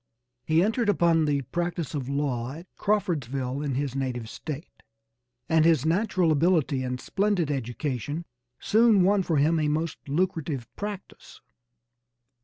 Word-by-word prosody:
He 160 +2 +4
entered 220 +2 +1
upon 170 -4 +3
the 145 -2 0
practice 175 -3 -2
of 135 -3 -3
law 135 -3 -1
at 165 +4 -10
Crawfordsville 140 - -1
in 140 -3 -2
his 135 -1 -2
native 125 -4 -3
State, 155 +1 -8 0.7
and 160 -1 +4
his 160 -4 +4
natural 180 0 +2
ability 155 -3 +2
and 125 0 -3
splendid 195 -5 0
education 135 +4 -3 0.3
soon 220 -3 +4
won 200 +2 +4
for 165 -4 0
him 160 +3 +3
a 150 - +1
most 155 +2 -1
lucrative 155 -6 -1
practice. 205 -2 -8
155 Hz, 135 wpm, -26 LUFS, 140-180 Hz, 0.7 s, He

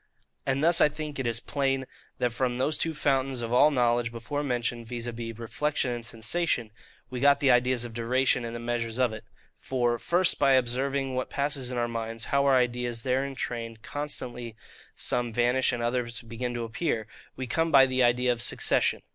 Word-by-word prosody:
And 135 +2 +1
thus 170 +1 +4
I - - +6
think 150 -1 -6
it 130 - -1
is 115 -1 -1
plain, 135 0 -1 0.3
that 125 -1 0
from 120 0 -1
those 145 +4 +1
two 160 -1 0
fountains 135 -3 0
of 115 +1 -3
all 130 +4 +6
knowledge 120 -3 +1
before 120 +5 -4
mentioned, 120 -3 -2
viz. 120 0 -5
reflection 120 +4 -2
and 120 -1 -4
sensation, 115 0 0 0.4
we 125 - -4
got 140 +1 +5
the 140 -2 +4
ideas 125 0 +2
of 120 - -8
duration, 125 +2 +1
and 115 0 -5
the - - -4
measures 120 -1 -2
of 125 -3 +2
it. 110 - -8 0.4
For, 120 -2 0
First, 175 +6 +2
by 135 - +5
observing 130 +2 +1
what 130 0 -2
passes 140 -3 -1
in 125 - -4
our 120 0 +1
minds, 115 0 -3
how 140 0 +3
our 135 - +5
ideas 120 -2 -1
there 130 +1 +1
in 140 -1 -5
train 115 -2 -4
constantly 125 -5 -5 0.4
some 120 -1 -1
vanish 120 +3 +2
and 120 -2 -3
others 120 0 -2
begin 120 +1 -4
to 120 - -3
appear, 115 0 -2 0.3
we 130 - -4
come 165 +6 0
by 135 -2 +8
the 130 0 0
idea 125 +1 +3
of 120 - -6
SUCCESSION. - - +1
125 Hz, 195 wpm, -27 LUFS, 120-135 Hz, 0.4 s, by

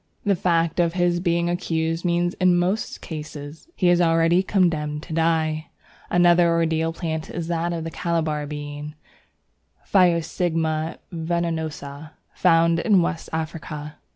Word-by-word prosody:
The 200 -1 +3
fact 170 -1 +1
of 170 -1 +2
his 175 -1 +1
being 170 -1 +1
accused 165 -1 -1
means 175 0 +1
in 180 -1 +5
most 185 +5 -1
cases 150 -1 -8
that 340 - -32
he 180 - +2
is 175 0 +4
already 165 +1 +4
condemned 155 -6 0
to 165 - -8
die. 160 -1 +1 0.4
Another 175 -1 +5
ordeal 165 -1 +1
plant 160 -2 -4
is 170 -1 -5
the 165 -1 -2
Calabar 160 -3 -1
Bean 145 0 -6 0.9
(Physostigma 165 -3 +1 0.2
venenosa), 160 -3 -3 0.2
found 165 -1 +3
in 190 -1 +4
West 170 -1 -3
Africa. 155 -2 -5
165 Hz, 125 wpm, -23 LUFS, 160-175 Hz, 0.9 s, in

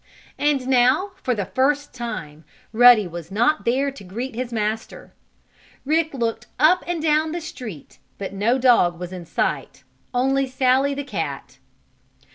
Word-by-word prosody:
And 285 -3 +1
now, 260 +10 +3
for 250 - 0
the 200 -3 -2
first 285 +6 0
time, 170 -11 -6 0.3
Ruddy 240 -2 +7
was 170 -1 -8
not 240 +10 +1
there 270 +4 +1
to 270 - -12
greet 235 +8 -5
his 245 +1 -4
master. 220 0 -4 0.7
Rick 315 +1 +1
looked 230 -1 -2
up 335 +6 +4
and 350 -1 -2
down 310 0 +2
the 345 - -2
street 245 - -9 0.2
but 195 -1 -6
no 215 +6 +1
dog 235 -10 +3
was 180 +1 -6
in 175 -2 -8
sight; 140 -2 -2 0.3
only 270 +2 +1
Sallie, 260 +2 +2
the 285 - -4
cat. 280 - -5
250 Hz, 150 wpm, -22 LUFS, 210-280 Hz, 0.7 s, Ruddy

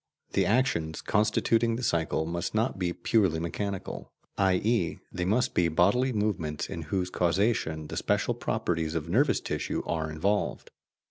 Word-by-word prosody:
The - - +2
actions 105 - +1
constituting 115 +2 +2
the 125 - -5
cycle 80 -4 0
must 85 +4 -3
not 110 -2 0
be 90 -2 0
purely 95 -4 +1
mechanical, 95 +3 -4 0.2
i.e. 95 0 +1
they 90 0 -2
must 125 +7 +1
be 85 - +3
bodily 100 +11 +3
movements 100 -9 -2
in 85 - -4
whose 90 0 -1
causation 85 -3 +1
the - - -6
special - - +1
properties 80 -1 -2
of 80 -1 -2
nervous 130 - +3
tissue - - -3
are 80 -2 -2
involved. 100 +7 -1
90 Hz, 145 wpm, -28 LUFS, 80-110 Hz, 0.2 s, be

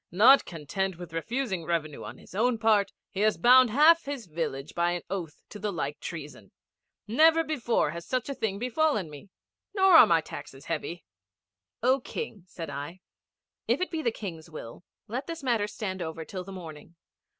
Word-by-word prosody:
'Not 235 +10 +6
content 175 +3 -3
with 175 -2 -9
refusing 200 +1 -2
revenue 160 -3 -2
on 110 +4 -8
his - - -16
own 235 +4 +2
part, 220 -3 +3 0.2
he 195 - -5
has 215 +1 +3
bound 250 0 +7
half 310 +7 +5
his 280 -5 -5
village 155 -4 -4
by 175 0 +1
an 175 - -4
oath 170 -6 -5
to 210 - -9
the 210 0 -2
like 150 -5 -3
treason. 150 - -8 0.6
Never 320 +8 +5
before 240 - 0
has 170 +1 -8
such 255 -2 -1
a 280 - -2
thing 220 -6 -2
befallen 250 - 0
me! 145 +6 -12 0.5
Nor 385 -3 +6
are 280 - +10
my 165 -4 +4
taxes 135 -2 -10
heavy.' 165 +1 -4 0.8
'O 260 +2 +4
King,' 240 - -6
said 165 -4 -7
I. 145 +6 -7 0.7
'If - - +2
it 365 - -2
be 325 -2 -2
the 240 - +1
King's 175 -8 -7
will 155 -2 -9 0.2
let 245 +5 -4
this 330 -3 -6
matter 230 -5 +1
stand 190 -3 -5
over 160 -1 -5
till 185 +2 -6
the 195 - -10
morning. 165 -3 -10
195 Hz, 185 wpm, -28 LUFS, 165-250 Hz, 0.8 s, are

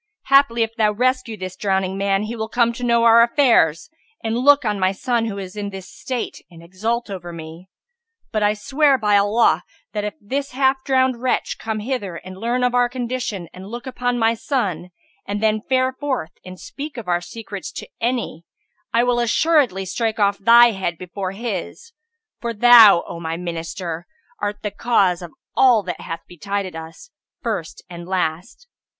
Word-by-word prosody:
Haply, 275 -4 +4
if 225 0 -5
thou 215 -3 +2
rescue 250 -1 0
this 185 -1 -6
drowning 190 -1 -1
man, 195 0 0
he 220 +2 -4
will 220 -1 -4
come 235 0 +2
to 245 - -8
know 235 -1 +3
our 230 0 +7
affairs, 235 - +3 0.4
and 225 0 -1
look 280 +2 +4
on 210 -2 0
my 185 0 +2
son 235 +3 -1
who 210 -3 -4
is 190 -1 -7
in 205 -1 -4
this 195 -2 -9
state 255 -2 -5
and 165 -2 -14
exult 220 +6 -3
over 175 -3 -6
me; 165 +2 -10 0.6
but 215 -2 -1
I 210 0 +2
swear 275 +6 +2
by 210 -4 +2
Allah, 200 -4 +3 0.3
that 210 -1 -2
if 210 0 -4
this 275 +6 -4
half 265 0 +1
drowned 260 -2 +1
wretch 255 - -1
come 220 -1 -3
hither 210 -7 -3
and 185 +2 -9
learn 235 +5 -1
our 245 0 +2
condition 240 -7 -4
and 185 +1 -10
look 240 +4 -7
upon 245 -1 -2
my 225 -1 +3
son 200 - -2 0.4
and 205 +1 -2
then 215 0 +1
fare 260 +2 +1
forth 260 - -3
and 185 0 -10
speak 290 -1 -8
of 225 -5 -7
our 175 0 +1
secrets 200 +2 -8
to - - -7
any, 235 -8 -2 0.5
I 235 +1 +3
will 245 -1 +1
assuredly 240 - +2
strike 225 +3 -2
off 200 -1 +2
thy 235 +3 +7
head 185 -4 -3
before 185 +1 -5
his; 230 - -5 0.5
for 235 -1 -4
thou, 225 -5 +8
O 170 - -7
my 165 0 -4
Minister 170 0 -5 0.3
art 205 +1 -4
the 210 - -2
cause 195 -5 +1
of 175 -2 -8 0.2
all 245 -5 +5
that 180 -1 -5
hath 165 - -6
betided 195 +1 -4
us, 165 - -10 0.3
first 205 -9 -4
and 170 -1 -9
last. 185 - -3
215 Hz, 180 wpm, -21 LUFS, 185-245 Hz, 0.6 s, thou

